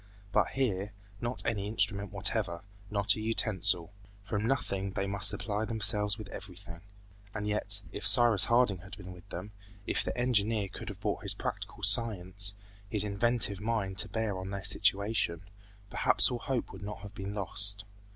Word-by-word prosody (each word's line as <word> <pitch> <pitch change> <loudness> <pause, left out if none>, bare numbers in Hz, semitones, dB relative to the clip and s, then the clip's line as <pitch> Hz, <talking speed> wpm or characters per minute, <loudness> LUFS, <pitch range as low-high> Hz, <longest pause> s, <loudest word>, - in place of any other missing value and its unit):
But 105 - +2
here, 105 -6 -3 0.3
not 120 +1 -5
any 100 -3 -2
instrument 100 -2 -1
whatever, 95 -3 -2 0.3
not 100 -1 +2
a 110 - -6
utensil. 100 -5 +3 0.3
From 105 +2 -3
nothing 100 -7 -3
they 95 - -2
must 100 +1 +7
supply 105 0 -2
themselves 105 -2 +2
with 110 -3 -9
everything. 90 -3 -11 0.5
And 105 - -4
yet, 100 -1 0
if - - +1
Cyrus 120 -5 +8
Harding 115 -5 +1
had 100 +3 -12
been 90 -3 -10
with 90 -1 -15
them, 90 +4 -8 0.3
if - - -1
the - - -5
engineer 110 -4 0
could - - -9
have - - -10
brought - - -3
his - - -2
practical - - -6
science, 100 -1 +3 0.3
his 105 0 -1
inventive 105 0 +1
mind 105 -4 -3
to - - +3
bear 110 -4 -3
on 95 +1 -7
their 100 -1 -6
situation, 100 -3 0 0.5
perhaps - - +3
all 120 - -4
hope 125 0 -4
would - - -11
not 105 +1 -8
have 105 -1 -11
been 100 +1 -7
lost. 100 +1 -1
100 Hz, 170 wpm, -29 LUFS, 95-110 Hz, 0.5 s, Cyrus